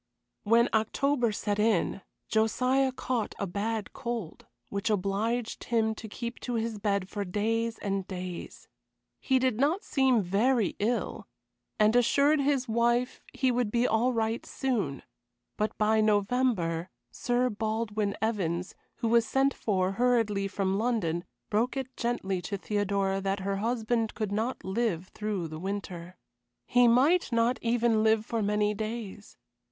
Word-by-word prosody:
When 230 +3 +4
October 240 +3 +1
set 205 0 -2
in 210 -3 +1 0.3
Josiah 255 +5 +2
caught 250 -3 -2
a 200 - -2
bad 205 +3 -3
cold, 235 -8 -5 0.2
which 200 +3 -2
obliged 215 +4 -1
him 225 -2 +1
to 220 0 -9
keep 235 +2 -6
to 245 - -3
his 225 -1 -2
bed 200 -2 0
for 205 +1 -3
days 225 +4 -1
and 195 -2 -2
days. 180 -2 -7 0.5
He 265 - +2
did 255 -3 +1
not 310 +8 +2
seem 265 -6 +2
very 210 +4 +2
ill, 230 +4 -1 0.5
and 215 +2 +4
assured 280 +5 +4
his 275 -2 +1
wife 235 +2 +1
he 260 -2 +1
would 245 -3 0
be 235 +3 +1
all 235 +2 +2
right 225 -1 -1
soon; 210 - -2 0.5
but 215 +1 -2
by 215 +1 +3
November, 205 -5 +1 0.2
Sir 245 0 0
Baldwin 215 -1 -2
Evans, 185 -5 -1 0.2
who 230 - -2
was 230 0 +4
sent 270 0 +2
for 190 -3 0
hurriedly 215 -3 +1
from 195 0 -1
London, 195 -8 0 0.3
broke 230 +6 +1
it 260 -1 -5
gently 195 -6 -1
to 195 +3 -4
Theodora 200 0 0
that 195 0 -1
her 195 +1 -1
husband 225 +1 -1
could 215 -3 -2
not 220 +5 -2
live 190 -3 -1
through 210 -5 -3
the 155 0 -7
winter. 185 -2 -5 0.5
He 245 0 +4
might 270 +8 +4
not 235 +2 +2
even 230 -2 +2
live 220 0 +3
for 230 -1 -2
many 210 0 +1
days. 215 -1 -6
220 Hz, 145 wpm, -29 LUFS, 200-240 Hz, 0.5 s, When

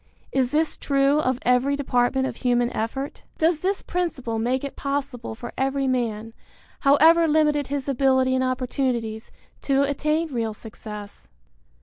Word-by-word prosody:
Is 260 -2 +1
this 310 +2 0
true 275 +1 +2
of 255 -4 +1
every 250 +3 +3
department 265 -1 +1
of - - -4
human 245 -1 +1
effort? 270 +6 -4 0.2
Does 325 0 +2
this 385 +4 -1
principle 275 -11 -2
make 250 +4 0
it 280 - -5
possible 275 -5 -3
for 240 +1 -8
every 270 +1 0
man, 225 -3 -1 0.5
however 320 +4 +5
limited 300 -2 +2
his 280 -1 -3
ability 260 -1 +2
and 260 0 +1
opportunities, 250 -3 -2 0.3
to 275 0 +2
attain 305 +2 0
real 225 -3 -2
success? 210 -2 -9
265 Hz, 140 wpm, -24 LUFS, 245-285 Hz, 0.5 s, however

